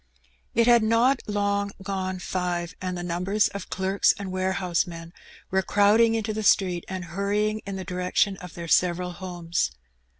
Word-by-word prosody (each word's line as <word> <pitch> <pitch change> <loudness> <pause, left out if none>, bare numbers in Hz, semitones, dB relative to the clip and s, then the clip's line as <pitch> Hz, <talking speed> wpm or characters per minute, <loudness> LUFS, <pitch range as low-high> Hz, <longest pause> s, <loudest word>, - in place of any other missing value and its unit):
It 230 - +4
had 240 -1 +6
not 230 +4 +3
long 200 -1 0
gone 190 -1 -3
five, 175 -2 -3
and 185 -1 -3
numbers 185 +5 +1
of 200 -2 -7
clerks 190 +1 +2
and 195 -2 -5
warehouse 185 -1 0
men 165 0 -9 0.4
were 190 0 +3
crowding 210 +4 +4
into 220 -1 -2
the 220 - -3
street 185 -4 +2
and 185 -1 -5
hurrying 205 +4 -1
in 200 - -4
the 190 - -5
direction 180 +3 0
of 180 -3 -10
their 170 -1 -6
several 180 +1 +2
homes. 175 - -2
190 Hz, 160 wpm, -25 LUFS, 180-205 Hz, 0.4 s, had